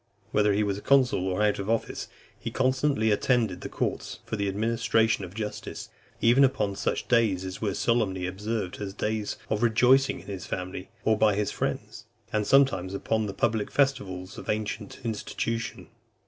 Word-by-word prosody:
Whether 105 -1 +3
he 105 +2 +2
was 100 -1 -1
consul 130 -8 +3
or 95 +3 0
out 105 -1 +2
of 100 +2 -4
office, 115 0 -1 0.3
he - - -4
constantly 130 -3 +1
attended 110 -4 +1
the - - -5
courts - - -3
for - - -3
the 100 -1 -1
administration 110 +1 +1
of 90 +1 -8
justice, 105 -1 -5 0.3
even 120 +4 +5
upon 105 -7 +1
such - - -2
days 110 -6 +2
as 95 0 -6
were 100 -3 -1
solemnly 100 -6 +1
observed 100 +1 -3
as 100 -1 -4
days 105 0 -2
of 110 - +1
rejoicing 125 +4 +4
in - - -17
his 95 -3 -6
family, 90 0 -5 0.2
or 110 -1 +3
by 105 -2 +4
his 105 0 0
friends; - - -4 0.3
and 105 -1 +1
sometimes 125 -9 +3
upon 110 +2 0
the - - -3
public 110 -2 0
festivals 100 -10 0
of - - -10
ancient 105 -1 -3
institution. 115 +1 -3
105 Hz, 170 wpm, -27 LUFS, 100-115 Hz, 0.3 s, even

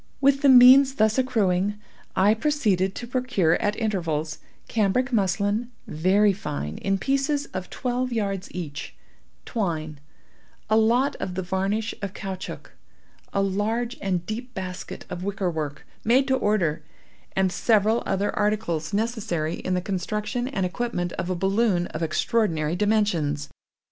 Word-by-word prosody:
With 275 0 +3
the 285 - +5
means 260 +2 +8
thus 220 +1 +3
accruing 205 -6 +1 0.4
I 200 +3 +5
proceeded 215 - +1
to 240 - -5
procure 240 -9 +1
at 205 0 +1
intervals, 165 -9 -2 0.3
cambric 235 +5 +1
muslin, 205 +3 +1 0.2
very 195 +6 +3
fine, 75 - -5
in 195 0 0
pieces 275 +5 0
of 185 -1 -5
twelve 250 0 -2
yards 200 -4 -2
each; 145 - -6 0.5
twine; 160 -8 -3 0.7
a - - +5
lot 235 +5 +3
of 180 - -4
the 190 - -2
varnish 195 +5 -1
of 200 0 -5
caoutchouc; 190 -2 -6 0.6
a 195 - +1
large 220 +5 -1
and 180 -3 -1
deep 245 +4 -6
basket 185 -2 -6
of 180 0 -6
wicker 195 -2 -1
work, 150 -3 -5 0.2
made 255 +4 +3
to 265 - +4
order; 185 -10 +1 0.5
and 190 -1 +2
several 220 +2 +2
other 200 +2 0
articles 200 -7 -1
necessary 205 -8 -1
in 185 +1 -2
the 180 - 0
construction 210 +6 -2
and 195 -9 -1
equipment 180 -3 -2
of 175 - -4
a 185 - 0
balloon 195 0 +1
of 155 - -6
extraordinary 165 -2 0
dimensions. 175 -8 +1
200 Hz, 140 wpm, -25 LUFS, 180-230 Hz, 0.7 s, means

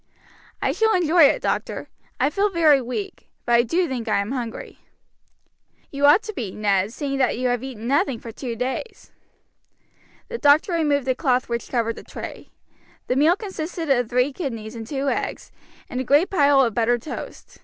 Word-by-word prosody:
"I - - +2
shall 445 0 +2
enjoy 340 -2 +5
it, - - +2
doctor. - - -2 0.3
I 270 +3 +2
feel 400 +5 +1
very 315 -7 +4
weak; 375 - -6 0.2
but 240 - +1
I 235 - +6
do 335 +10 0
think 250 -4 -4
I 215 - +2
am 200 +3 -2
hungry." 240 -4 -6 1.1
"You 280 0 +2
ought 325 +9 +6
to 435 - -6
be, 225 - -5
Ned, 200 -1 +1
seeing 275 +1 -3
that 255 -3 +2
you 250 0 0
have 245 -1 0
eaten 245 -4 -7
nothing 275 -1 +1
for 230 - -9
two 235 0 -5
days." 260 - -5 1.2
The 470 -1 -6
doctor 295 +5 +4
removed 295 -5 +1
the 260 - +2
cloth 255 -2 0
which 235 0 -3
covered 230 -2 -1
the - - -9
tray. - - -9 0.6
The 250 - -1
meal 305 +6 +4
consisted 340 -6 -4
of 245 -4 +2
three 250 +3 +1
kidneys 230 -9 -5
and 225 -2 -8
two 275 +1 -3
eggs, - - -3 0.4
and 250 - -4
a - - -2
great 290 +8 +3
pile 285 -6 +4
of 235 -4 +1
buttered 235 +1 +1
toast. - - -8
270 Hz, 185 wpm, -23 LUFS, 240-315 Hz, 1.2 s, I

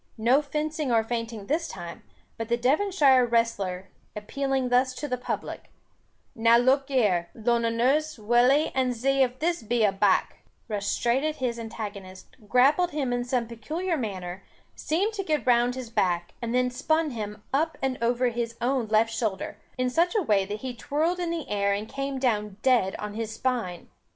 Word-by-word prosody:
No 240 +6 +4
fencing 300 -1 -2
or 225 -1 +3
feinting 230 -2 -4
this 325 +7 -1
time; 175 -2 -8 0.3
but 225 0 -5
the 235 - +2
Devonshire 275 0 +4
wrestler, 205 -6 0 0.3
appealing 265 +4 -2
thus 255 +1 +2
to 295 - -4
the 255 - -1
public, 250 - -5 0.6
"Now 230 +1 +5
look 265 +3 +3
here, 205 -11 +1
Lunnoners, 240 +6 +1
wull 240 +4 +4
e, 295 +3 +2
and 255 -2 +1
zee 270 +3 +1
if 255 -1 +1
this 340 +4 0
here 220 - -15
be 240 -2 +2
a 205 - +4
back," 195 0 +2 0.3
rushed 205 -3 -2
straight 240 +4 +1
at 310 0 -1
his 245 -4 -2
antagonist, 205 -4 -8
grappled 285 +8 +4
him 280 -6 -2
in 245 0 0
some 245 -1 -1
peculiar 315 +11 -3
manner, 190 - -5 0.3
seemed 385 +8 -1
to 400 -2 -3
get 305 -4 -1
round 245 0 +3
his 255 -3 -7
back, 175 -5 0
and 235 -1 -3
then 250 0 +1
spun 315 +4 0
him 210 -3 -6
up 320 +4 +1 0.2
over 245 +1 +2
his 235 0 -3
own 250 -1 0
left 220 +1 +2
shoulder, 215 -5 -3 0.2
in 255 0 0
such 345 - +2
a 425 - +2
way 205 -7 +2
that 210 +2 -6
he 260 -1 -4
twirled 315 +9 -1
in 350 -1 -1
the 335 -2 -3
air 200 -1 +1
and 205 +2 -3
came 275 +1 -4
down 210 -6 -1
dead 245 -8 +3
on 210 0 -5
his 225 0 -4
spine. 235 -9 -2
245 Hz, 180 wpm, -26 LUFS, 220-275 Hz, 0.6 s, Now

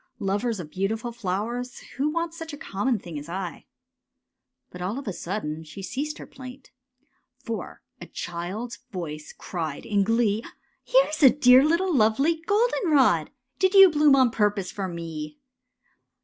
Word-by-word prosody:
Lovers 205 +1 -1
of 155 -4 -8
beautiful 220 +5 -2
flowers, 235 +4 -3 0.2
who 285 +3 +1
wants 335 +1 -2
Such 325 -1 -7
a - - -6
conmion 235 -3 -1
thing 170 -5 -7
as 145 +3 -10
I? 180 0 -5 0.5
" - - -58
But 180 - -9
all 195 +7 -2
of 275 - -7
a 200 - -2
sudden 160 -4 -4
she 160 +5 -10
ceased 290 +9 -4
her - - -9
plaint, 260 0 -12 0.7
For - - -6 0.2
a - - -8
child's 185 +8 -5
voice 155 -7 -6
cried 160 -5 -5
in 200 -2 +2
glee, 225 0 +1
^' - - -14 0.4
Here's - - +2
a 270 - +9
dear 255 -1 +6
little 340 +3 +2
lovely 275 +9 +2
goldenrod! 315 - +3 0.3
Did 380 +1 +2
you 390 -2 +9
bloom 295 -2 +5
on 260 -3 +4
purpose 205 -4 0
for 195 -2 -4
me? 160 -3 -6
225 Hz, 160 wpm, -25 LUFS, 180-285 Hz, 0.7 s, a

